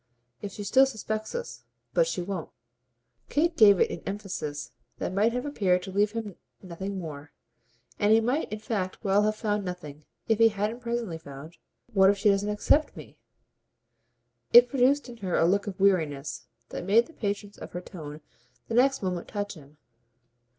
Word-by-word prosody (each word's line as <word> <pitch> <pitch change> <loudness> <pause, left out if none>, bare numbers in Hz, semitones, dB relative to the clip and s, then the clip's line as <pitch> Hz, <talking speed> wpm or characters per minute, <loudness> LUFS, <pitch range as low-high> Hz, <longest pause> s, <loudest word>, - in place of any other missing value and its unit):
"If 200 -1 -6
she 205 - -6
still 265 +6 +5
suspects 220 - -4
us. 485 0 -6 0.3
But - - +3
she 180 - -2
won't." 185 -3 -5 0.8
Kate 330 +3 +1
gave 205 - +7
it - - +3
an - - -6
emphasis 180 -8 -5 0.3
that - - -3
might 210 +4 +3
have 250 +2 -3
appeared 185 -10 +1
to 190 - -7
leave 205 +2 +1
him 220 -5 -5 0.3
nothing 190 +2 -5
more; 150 -5 -7 0.7
and 205 0 +3
he 220 - +7
might 250 +7 -1
in 215 - -3
fact 205 -4 -4
well 200 +1 +3
have 215 0 +1
found 210 -1 -1
nothing 155 -5 -7 0.2
if 225 -1 +2
he 225 0 +7
hadn't 215 +3 -2
presently 235 -8 -3
found: 145 +2 -11 0.3
"But 245 - -28
what 190 0 +6
if 200 - +2
she 210 +1 +3
doesn't 200 +1 0
accept 210 +8 +2
me?" - - -12 1.3
It 245 +1 +9
produced 275 +3 +2
in 240 -1 -10
her 190 -5 -2
a - - +4
look 200 +4 +2
of 195 -2 -6
weariness 145 -10 +1 0.2
that - - -5
made 215 +6 +4
the 330 - -17
patience 205 -4 -4
of - - -9
her 175 - -4
tone 155 -5 -9 0.5
the - - -3
next 265 0 +3
moment 180 -2 -2
touch 205 -1 -4
him. 150 -3 -16
205 Hz, 185 wpm, -27 LUFS, 180-225 Hz, 1.3 s, It